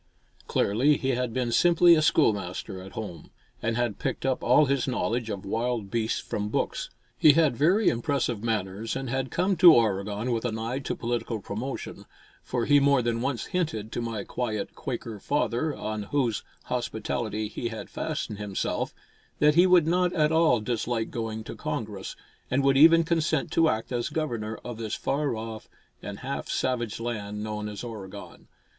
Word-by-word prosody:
Clearly 135 +9 +3
he 135 - -2
had 125 -2 0
been 120 0 -1
simply 175 +5 +6
a 155 - +4
schoolmaster 100 - +1
at 95 +1 -11
home, 90 -8 -7 0.3
and 115 0 -1
had 120 -4 -1
picked - - -3
up 130 -1 0
all 125 +5 +5
his 140 -1 0
knowledge 120 -2 -1
of 100 -1 -5
wild 115 -1 -2
beasts 115 -1 0
from 105 0 -3
books. - - -2 0.3
He 150 - +8
had 155 -4 +3
very 180 - +3
impressive 120 -3 0
manners 110 -1 -2
and 135 -2 -4
had 130 -1 -1
come 185 +2 +1
to 170 -1 +9
Oregon 105 +1 0
with 115 -1 -1
an 115 -3 -2
eye 115 +4 -2
to 135 - -3
political 120 -1 -2
promotion, 110 +7 -6 0.3
for 120 -2 -2
he 145 0 +6
more 140 -2 +3
than 115 0 0
once 130 -3 -2
hinted 150 - -1
to - - -3
my 115 -3 -3
quiet 110 -4 -3
Quaker 115 -4 -5
father, 145 +3 0
on 110 0 -4
whose 125 -7 0 0.2
hospitality 110 -3 -2
he 120 - -4
had 110 -3 -6
fastened 105 - -4
himself, 100 -2 -2 0.4
that 150 0 +5
he 175 +4 +6
would 180 -3 +6
not 180 +2 +2
at 155 -3 +2
all 160 -8 +4
dislike 115 0 -2
going 110 -1 -4
to - - -8
Congress, 105 -4 -4 0.3
and 135 +2 +1
would 135 0 +4
even 165 +4 +7
consent 160 -2 0
to 165 -1 +4
act 110 -1 -2
as 120 -1 -1
Governor 115 -9 -3
of 120 -2 -5
this 110 -2 -3
far 140 -3 -1
off 110 0 -7 0.3
and 100 -1 -7
half 135 +2 -4
savage 120 -4 -1
land 105 -3 -4
known 105 0 -4
as 105 +2 -7
Oregon. 105 -6 -9
120 Hz, 175 wpm, -27 LUFS, 110-140 Hz, 0.4 s, to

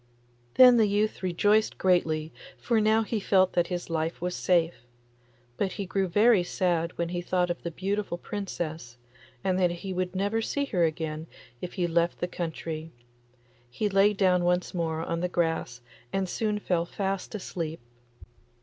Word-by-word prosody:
Then 250 -1 +8
the 220 -2 +4
youth 210 +2 0
rejoiced 205 +4 +2
greatly, 160 -4 +1 0.2
for 230 -3 +1
now 220 +1 +3
he 220 0 -2
felt 190 -2 +3
that 175 -1 +2
his 175 -1 -4
life 165 0 -2
was 180 +1 -2
safe; 170 -6 +1 0.7
but 195 - -1
he 200 - -4
grew 190 +1 0
very 210 +3 +5
sad 175 -2 -1
when 170 0 -1
he 175 0 -3
thought 180 0 0
of 175 - -5
the 170 - -3
beautiful 195 +2 -2
Princess, 165 -11 -5 0.5
and 185 -1 +1
that 180 -1 +4
he 180 +3 -5
would 185 0 -2
never 205 +4 0
see 280 +5 -1
her 180 -10 0
again 160 0 -3 0.3
if 180 - -5
he 180 -3 0
left 170 0 +1
the 175 - -2
country. 160 -2 -5 0.8
He 205 - -1
lay 195 +1 +4
down 185 -3 +3
once 180 +1 +1
more 165 -2 -2
on 170 0 -2
the 180 +1 -1
grass 165 -8 -1 0.3
and 195 -1 -1
soon 210 +3 -1
fell 175 -4 -1
fast 195 +2 -3
asleep. 165 -5 -4
180 Hz, 165 wpm, -27 LUFS, 170-200 Hz, 0.8 s, Then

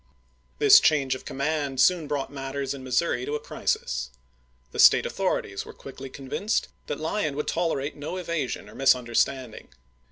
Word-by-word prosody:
This 425 -1 +8
change 140 -4 +2
of 130 - -7
command 140 -1 -2
soon 170 +1 +4
brought 140 -1 -3
matters 135 0 -3
in 135 -2 -8
Missouri 125 0 0
to 145 - -2
a - - -2
crisis. 65 - -2 0.6
The - - -8
State - - +7
authorities - - -2
were - - -11
quickly 135 0 -10
convinced 140 - -2 0.2
that 145 - -3
Lyon 155 -1 -1
would 150 - -3
tolerate 155 -4 -1
no 150 +5 -5
evasion 170 -7 -3
or - - -13
misunderstanding. 125 -1 +1
140 Hz, 155 wpm, -26 LUFS, 130-155 Hz, 0.6 s, This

